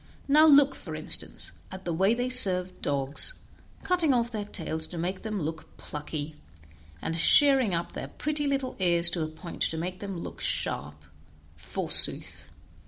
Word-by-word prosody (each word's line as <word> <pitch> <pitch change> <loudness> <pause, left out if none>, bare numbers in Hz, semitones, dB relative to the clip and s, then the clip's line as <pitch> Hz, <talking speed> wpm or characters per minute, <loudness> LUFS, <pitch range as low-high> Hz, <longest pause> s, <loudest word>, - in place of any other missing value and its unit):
Now 305 +3 +4
look, 285 -2 +4
for - - -10
instance, - - 0 0.2
at 190 0 -11
the 170 - -4
way 190 +7 0
they 245 +1 -3
serve 185 -8 +2
dogs, 140 - -3 0.5
cutting 335 -7 0
off 235 0 -2
their 210 -3 -6
tails 160 -5 -4
to 175 - -9
make 180 +3 -5
them 215 -2 -6
look 160 0 -8
plucky, 150 0 -8 0.7
and 165 - -4
shearing 260 - +3
up 170 +1 -6
their - - -8
pretty 295 -1 -3
little 270 -2 -4
ears 170 -2 +7
to 170 - -3
a 155 - -3
point 160 +2 -12
to 160 - -2
make 180 +3 -6
them 200 -2 -8
both 170 - -8
look - - -10
sharp, 75 +1 -2 0.6
forsooth. 80 - +4
185 Hz, 170 wpm, -25 LUFS, 160-255 Hz, 0.7 s, ears